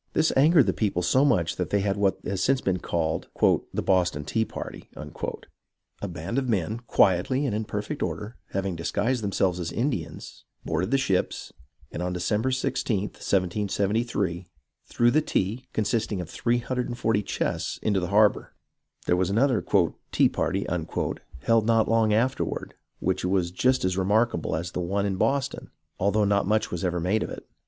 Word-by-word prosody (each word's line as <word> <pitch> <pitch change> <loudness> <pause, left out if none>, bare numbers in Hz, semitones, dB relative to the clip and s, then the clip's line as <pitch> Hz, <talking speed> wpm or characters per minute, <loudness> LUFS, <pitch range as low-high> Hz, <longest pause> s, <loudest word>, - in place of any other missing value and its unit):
This 160 +1 +2
angered 150 +2 +6
the - - +1
people 95 -5 0
so 130 +10 +3
much 90 - +2
that 90 -3 -2
they 100 - +1
had 100 0 0
what 100 -1 +1
has 95 0 -2
since 135 +6 +3
been 95 -6 -1
called 80 -2 -2 0.4
" - - -42
The - - -1
Boston 85 -6 +1
Tea 110 +8 +1
Party." - - -8
A - - -17
band 75 -1 -9
of - - -1
men, - - -6 0.7
THE - - -2
BEGINNINGS 85 - -3
OF 130 - -3
THE 115 -4 +3
TROUBLE 95 +5 -3
1/ 120 0 -11
quietly 100 +10 +3
and 115 -7 -1
in 110 +1 -2
perfect 105 +8 -4
order, 105 +3 -3
having 95 -2 -2
disguised 105 +8 -1
themselves 95 -2 0
as 85 - -3
Indians, 105 - -3 0.2
boarded 80 +4 -1
the 135 - +3
ships, 100 -9 -1 0.4
and - - -5
on 90 0 -1
December 105 +7 0
i6th, 130 +1 -1
1773, 100 -1 -1 0.4
threw 120 0 +3
the 155 - +3
tea, 120 -2 -1
consisting 110 -1 -1
of 90 -2 -6
340 120 -2 0
chests, - - -2
into 100 -3 +2
the 90 - -2
harbour. 105 +2 +3 0.5
There 90 - +3
was 90 0 +1
another 115 -1 +2 0.5
"Tea - - +4
Party" - - -1 0.8
held 115 -1 +3
not 115 -1 +3
long 115 -1 +3
after 120 +5 +2
ward, - - -5 0.2
which - - -1
was 90 -1 +1
just 130 +5 +2
as 95 0 0
remarkable 105 -2 +1
as 85 +2 -3
the 90 - -3
one 100 +3 -1
in 95 -2 -1
Boston, 135 +5 -1 0.3
although 100 +2 +2
not 100 -1 +2
much 105 +1 +1
was 90 0 -3
ever 90 -1 0
made 95 +6 +1
of - - -3
it. - - -9
100 Hz, 185 wpm, -26 LUFS, 90-120 Hz, 0.8 s, angered